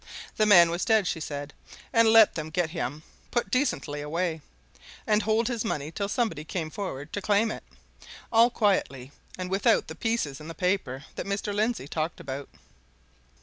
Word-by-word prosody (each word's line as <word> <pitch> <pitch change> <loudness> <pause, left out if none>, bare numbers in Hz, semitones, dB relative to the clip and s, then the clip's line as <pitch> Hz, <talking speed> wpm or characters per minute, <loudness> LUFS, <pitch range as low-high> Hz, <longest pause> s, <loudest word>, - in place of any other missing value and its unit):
The 215 - +3
man 175 -5 +7
was 175 +2 -1
dead, 220 -3 +3
she 175 - -1
said, 145 -1 -6 0.4
and 230 -1 +5
let 220 -1 +7
them 155 -1 -5
get 170 -1 -1
him 150 -2 -4 0.3
put 240 - -1
decently 145 - 0
away, 160 +2 -2 0.6
and 210 0 +3
hold 220 +2 +1
his 235 -3 -2
money 150 -9 -3
till 200 +4 -3
somebody 215 - -1
came 160 0 -4
forward 150 -8 -6
to 205 - -2
claim 210 +3 +2
it - - -7 0.7
all 230 +2 +6
quietly 165 - 0 0.3
and 185 0 -5
without 195 +1 +3
the 160 - -6
pieces 170 - -2
in 155 - -9
the 165 - -7
paper 180 -8 -1
that - - -4
Mr. 200 +1 -2
Lindsey 215 - -1
talked 160 +3 -3
about. 140 -3 -6
180 Hz, 175 wpm, -27 LUFS, 155-215 Hz, 0.7 s, man